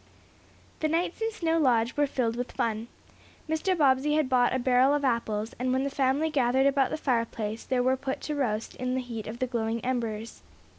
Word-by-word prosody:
The 310 - +1
nights 335 +5 -1
in 450 0 0
Snow 330 -6 0
Lodge 240 -4 +2
were 290 0 +2
filled 240 -4 -1
with 245 +1 -4
fun. 225 0 -1 0.6
Mr. 320 +4 0
Bobbsey 285 0 +3
had 305 -4 +1
bought 245 -2 +3
a 260 - +1
barrel 255 +2 +3
of 290 -1 -1
apples, 225 -3 -1
and 255 +1 0
when 260 +1 +1
the 280 - -2
family 275 +4 +1
gathered 265 -2 +2
about 275 -1 +3
the - - -3
fireplace 230 -5 -2
there 250 -1 +1
were 260 +1 +3
put 265 0 -4
to 300 - -3
roast 230 -7 -2
in 255 0 -2
the 260 - 0
heat 230 -4 -6
of 220 +2 -6
the 255 - 0
glowing 230 -2 -2
embers. 230 -3 -3
255 Hz, 205 wpm, -28 LUFS, 235-285 Hz, 0.6 s, Bobbsey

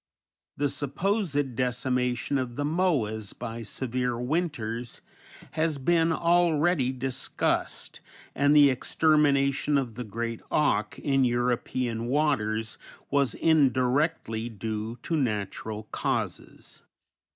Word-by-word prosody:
The 145 - +1
supposed 145 - -1
decimation 125 +2 0
of 125 -2 -4
the 145 - -2
Moas 145 - 0
by 115 0 -5
severe 125 +2 -2
winters 125 -5 -2 0.5
has 160 -2 0
been 165 +4 +2
already 170 -4 +2
discussed, 130 0 -2 0.3
and 145 +1 +3
the 145 -2 +7
extermination 145 0 +2
of 130 -4 -2
the 125 +3 -5
great 115 +1 -4
auk 125 -8 +1
in 135 -1 +1
European 120 -1 0
waters 110 -6 0 0.3
was 140 -2 +2
indirectly 135 -5 +2
due 110 +1 -4
to 165 - -1
natural 110 -4 -2
causes. - - -4
130 Hz, 100 wpm, -27 LUFS, 115-150 Hz, 0.5 s, the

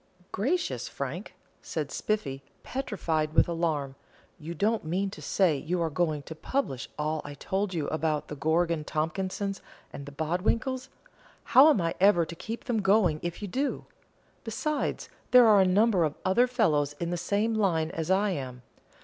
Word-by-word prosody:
"Gracious, 335 - -1
Frank," - - -6 0.3
said - - -4
Spiffy, 140 -11 -2 0.2
petrified 165 - -2
with - - +5
alarm, 160 -5 -1 0.5
"you 165 +2 -6
don't 215 +6 +1
mean 190 +5 -1
to - - -10
say 185 -6 +2
you 165 +5 -2
are 165 -2 0
going 155 -2 0
to 160 - -8
publish 155 - -3
all 155 +1 -1
I 145 0 -8
told 190 +5 -2
you 155 -3 -1
about 155 -1 -1
the 150 - -6
Gorgon 160 +2 +1
Tompkinses 190 +6 -2 0.3
and 140 - -8
the - - -7
Bodwinkles? 215 - -1 0.5
How 275 +4 +7
am 290 - +4
I 165 0 0
ever 190 -3 +5
to 170 - -8
keep 225 +7 -6
them 235 -4 0
going 190 -5 +3
if 175 +4 -5
you - - -3
do? 270 +9 -2 0.6
Besides, 280 +7 -2 0.2
there 250 -1 +8
are 210 -3 +6
a 190 - +4
number 200 -1 +3
of 155 -2 -1
other 235 +7 +4
fellows 155 - +1
in 170 +3 -4
the - - 0
same 205 +6 0
line 170 -7 +1
as 165 0 -4
I 195 +2 +3
am. 130 -6 -5
175 Hz, 170 wpm, -28 LUFS, 155-210 Hz, 0.6 s, there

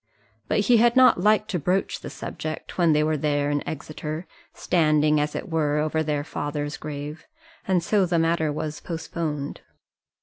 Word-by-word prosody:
But - - +2
he 235 +4 +4
had 235 +2 +4
not 255 -7 +6
liked 215 +1 +3
to 180 - 0
broach 180 +6 0
the - - -7
subject 155 -1 -6
when 170 -2 +5
they 150 0 +3
were 155 0 +1
there 145 0 0
in 145 0 0
Exeter, 155 +2 -5 0.3
standing, 155 -2 +2
as 150 0 -1
it - - -4
were, 155 -4 0
over 155 +1 0
their 150 -2 -1
father's 145 0 -4
grave, 150 - -7 0.4
and 185 -3 +2
so 200 0 +2
the 175 -1 +1
matter 165 -1 +1
was 150 0 -4
postponed. 160 -3 -4
155 Hz, 170 wpm, -25 LUFS, 150-175 Hz, 0.4 s, not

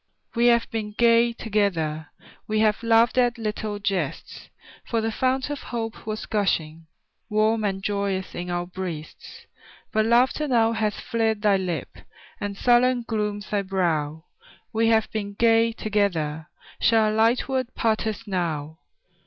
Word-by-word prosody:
We 235 0 +3
have 235 -1 +4
been 210 -2 -4
gay 235 0 +5
together; 180 -9 -1 0.4
We 215 0 0
have 215 0 +2
laughed 230 +1 +4
at 245 -1 +2
little 215 -1 -3
jests; 200 -2 -3 0.3
For 230 - -1
the 225 0 -1
fount 260 +4 0
of 290 - -4
hope 225 -2 -5
was 215 0 -3
gushing 165 -6 -1 0.4
Warm 215 +1 +2
and 195 -2 -2
joyous 200 -2 -2
in 180 0 -5
our 175 0 -2
breasts, 175 -4 -8 0.5
But 215 0 +2
laughter 255 +6 +3
now 230 -4 +3
hath 220 -2 -1
fled 225 -2 -1
thy 205 -2 +4
lip, 175 -6 -3 0.5
And 200 -1 -4
sullen 245 +1 +3
glooms 210 -2 -3
thy 205 -1 +1
brow; 160 -5 -1 0.5
We 225 +1 +2
have 220 -1 +3
been 205 -2 -4
gay 230 +1 +4
together, 175 -9 -1 0.3
Shall 220 -2 +3
a - - -2
light 225 +3 +2
word 260 -2 -2
part 220 0 0
us 215 - -4
now? 160 -5 -3
215 Hz, 150 wpm, -24 LUFS, 190-230 Hz, 0.5 s, gay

